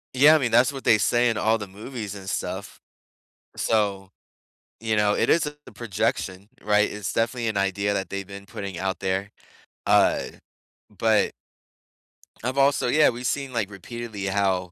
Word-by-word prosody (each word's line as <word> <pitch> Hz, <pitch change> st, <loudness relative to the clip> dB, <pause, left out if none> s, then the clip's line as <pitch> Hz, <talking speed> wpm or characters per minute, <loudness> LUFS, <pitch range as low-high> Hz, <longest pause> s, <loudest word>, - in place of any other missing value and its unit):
Yeah, 145 Hz, +4 st, +7 dB
I -, -, +6 dB
mean, 125 Hz, -6 st, -1 dB
that's 120 Hz, +4 st, +5 dB
what 135 Hz, -1 st, -8 dB
they 110 Hz, -, +5 dB
say 120 Hz, +4 st, +3 dB
in 115 Hz, -, -1 dB
all 110 Hz, +2 st, +2 dB
the 105 Hz, -, -7 dB
movies 105 Hz, +1 st, -7 dB
and 95 Hz, -2 st, -8 dB
stuff. -, -, -4 dB, 0.8 s
So, 100 Hz, -3 st, 0 dB, 0.7 s
you 110 Hz, 0 st, -1 dB
know, 105 Hz, -1 st, +3 dB
it -, -, +1 dB
is 160 Hz, -2 st, +3 dB, 0.2 s
a -, -, -12 dB
projection, 100 Hz, -3 st, -2 dB
right? 105 Hz, 0 st, +3 dB
It's 105 Hz, -6 st, -4 dB
definitely 115 Hz, +1 st, 0 dB
an 110 Hz, -2 st, -1 dB
idea 100 Hz, +1 st, 0 dB
that 95 Hz, -, -3 dB
they've 100 Hz, -1 st, -4 dB
been 100 Hz, 0 st, -10 dB
putting 100 Hz, -2 st, -6 dB
out 95 Hz, +1 st, -2 dB
there. 95 Hz, +2 st, -2 dB, 0.5 s
Uh, -, -, +4 dB, 0.7 s
but 110 Hz, +2 st, +2 dB, 1.1 s
I've 130 Hz, +3 st, -3 dB
also 140 Hz, -1 st, +3 dB
yeah, 150 Hz, +5 st, +5 dB
we've 120 Hz, +1 st, -5 dB
seen, 135 Hz, -1 st, -2 dB
like, 110 Hz, -4 st, -1 dB
repeatedly 105 Hz, +1 st, -7 dB
how 95 Hz, -2 st, 0 dB
105 Hz, 165 wpm, -25 LUFS, 100-120 Hz, 1.1 s, Yeah